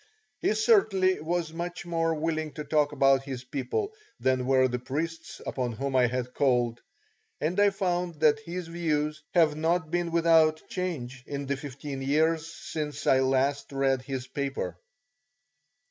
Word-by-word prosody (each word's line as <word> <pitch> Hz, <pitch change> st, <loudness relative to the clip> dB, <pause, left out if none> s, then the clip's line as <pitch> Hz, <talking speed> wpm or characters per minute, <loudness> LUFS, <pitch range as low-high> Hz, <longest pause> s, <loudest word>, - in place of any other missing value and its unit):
He -, -, +1 dB
certainly 215 Hz, -, +3 dB
was 165 Hz, 0 st, -2 dB
much 175 Hz, +1 st, -5 dB
more 165 Hz, -1 st, 0 dB
willing 155 Hz, -1 st, -2 dB
to 150 Hz, -, -5 dB
talk 150 Hz, -1 st, +2 dB
about 135 Hz, -2 st, +4 dB
his 135 Hz, -2 st, -6 dB
people 140 Hz, -, -3 dB, 0.3 s
than 130 Hz, -1 st, +1 dB
were 130 Hz, -1 st, +4 dB
the 125 Hz, 0 st, -2 dB
priests 160 Hz, +6 st, -4 dB
upon 125 Hz, -3 st, -2 dB
whom 135 Hz, +3 st, -3 dB
I 125 Hz, -1 st, +5 dB
had 125 Hz, +1 st, -3 dB
called, 120 Hz, -4 st, +1 dB, 0.6 s
and 170 Hz, +6 st, -1 dB
I 205 Hz, 0 st, +6 dB
found 180 Hz, -3 st, -1 dB
that 150 Hz, -2 st, +5 dB
his 170 Hz, +3 st, -6 dB
views 155 Hz, -3 st, -1 dB
have 160 Hz, -4 st, +5 dB
not 160 Hz, +1 st, 0 dB
been 175 Hz, -1 st, 0 dB
without 165 Hz, -2 st, +4 dB
change 135 Hz, -9 st, -4 dB
in 140 Hz, 0 st, -4 dB
the 140 Hz, +1 st, -1 dB
fifteen 140 Hz, 0 st, -6 dB
years 160 Hz, +4 st, +1 dB
since 150 Hz, -3 st, -5 dB
I 130 Hz, -, +5 dB
last 135 Hz, +2 st, +1 dB
read 135 Hz, -1 st, +1 dB
his 130 Hz, -1 st, -4 dB
paper. 135 Hz, -, -3 dB
150 Hz, 155 wpm, -28 LUFS, 135-165 Hz, 0.6 s, I